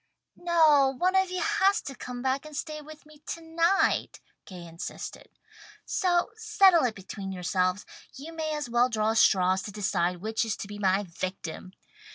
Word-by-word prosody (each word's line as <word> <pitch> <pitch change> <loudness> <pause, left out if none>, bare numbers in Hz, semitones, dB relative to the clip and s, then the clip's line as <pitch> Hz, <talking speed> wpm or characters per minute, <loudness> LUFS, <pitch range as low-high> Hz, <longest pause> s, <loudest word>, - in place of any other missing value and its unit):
"No, 310 -6 +4
one 365 +4 +1
of 380 -1 +3
you 365 0 -3
has 405 -1 +2
to 275 - -6
come 245 -1 -7
back 265 +1 0
and 305 -2 -9
stay 305 -2 -5
with 310 +1 -13
me 305 0 -17
to - - -4
night," 335 +4 +1 0.3
Gay 180 -2 -10
insisted. 165 0 -8 0.6
"So 360 -1 +1
settle 390 - +4
it 230 -3 -1
between 195 0 -7
yourselves. 185 +2 -1 0.3
You 310 +5 -9
may 315 -1 -3
as 295 -2 -4
well 240 +1 +2
draw 220 -1 0
straws 190 -4 +4
to 205 - -7
decide 180 -3 -1
which 220 +6 -2
is 225 -2 -2
to - - -6
be 205 0 -8
my 195 0 +2
victim." 185 0 -6
260 Hz, 175 wpm, -27 LUFS, -, 0.6 s, No